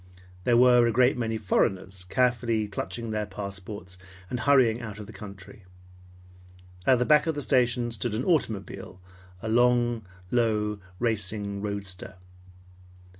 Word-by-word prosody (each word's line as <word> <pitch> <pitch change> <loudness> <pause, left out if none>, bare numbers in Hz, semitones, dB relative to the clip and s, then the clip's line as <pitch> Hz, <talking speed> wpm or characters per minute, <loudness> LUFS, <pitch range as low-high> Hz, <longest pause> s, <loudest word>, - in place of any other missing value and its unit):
There 120 -1 +4
were 125 -1 +6
a - - +2
great 125 +3 +4
many 115 -2 -2
foreigners 95 -2 -1
carefully 120 0 +1
clutching 105 +3 -4
their 105 -1 -2
transports 100 -2 -7 0.3
and 125 - -2
hurrying 125 -5 +4
out 105 -3 -7
of 105 - -8
the 110 - -12
country. 100 0 -11 1.2
At 130 - +6
the 125 - +1
back 150 +2 +4
of 160 - 0
the 145 - -2
station 120 0 +2
stood 110 0 -3
an 125 - -2
automobile, 105 - -1 0.4
a - - -3
low, 120 0 +3 1.0
racing 105 -3 -2
roadster. 100 -3 -5
110 Hz, 130 wpm, -27 LUFS, 100-120 Hz, 1.2 s, were